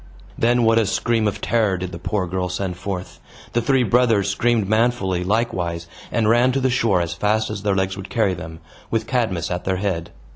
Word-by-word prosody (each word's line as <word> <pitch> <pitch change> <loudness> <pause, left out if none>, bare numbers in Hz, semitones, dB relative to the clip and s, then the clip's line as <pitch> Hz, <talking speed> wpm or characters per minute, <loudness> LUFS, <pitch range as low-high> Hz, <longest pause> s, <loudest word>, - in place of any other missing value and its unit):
Then 120 +1 +2
what 115 0 +4
a 110 - +1
scream 115 +1 +1
of 105 - -3
terror 110 -5 +1
did 90 0 -5
the 85 - -7
poor 95 +1 -1
child 90 0 -2
send 90 -1 -3
forth! 95 0 -6 0.3
The 120 - +2
three 135 +1 +2
brothers 115 -3 +3
screamed 115 -2 +1
manfully, 110 -5 +1
likewise, 90 -5 -1 0.3
and 110 -2 +1
ran 120 +3 +4
to 135 - +1
the 130 -1 +1
shore 115 -7 +2
as 85 0 -2
fast 105 +4 0
as 105 -2 -5
their 100 -1 +1
legs 95 0 -1
would 100 -1 -8
carry 110 -5 +1
them, 80 -2 -8 0.3
with 115 - -1
Cadmus 110 -11 -1
at 90 0 -2
their 95 -1 0
head. 90 -4 -2
100 Hz, 210 wpm, -21 LUFS, 90-115 Hz, 0.3 s, what